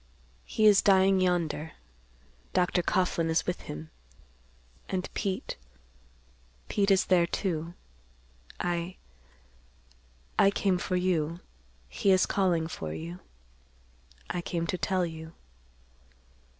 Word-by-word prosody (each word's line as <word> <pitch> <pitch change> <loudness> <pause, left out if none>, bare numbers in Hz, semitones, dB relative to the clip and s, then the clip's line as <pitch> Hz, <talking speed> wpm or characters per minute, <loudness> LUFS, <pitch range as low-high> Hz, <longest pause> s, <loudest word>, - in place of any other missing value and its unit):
"He 215 - +1
is 205 -2 +7
dying 190 -1 +5
yonder. 165 -4 0 0.8
Dr. 180 0 +2
Coughlan 170 -2 +1
is 160 - +1
with 180 - -2
him—and 65 - -9
Pete—Pete - - -5
is 195 -1 +4
there, 175 -2 +4
too. 170 -2 -2 0.8
I—I 60 - -4
came 195 -2 +1
for 185 - -2
you. 170 -3 0 0.5
He 130 - 0
is 185 -1 +5
calling 180 -5 +1
for 80 - -5
you. 85 +3 -7 1.1
I 175 - -2
came 170 -1 -2
to 185 - -2
tell 185 -2 +1
you. 160 0 -8
160 Hz, 100 wpm, -29 LUFS, -, 1.1 s, is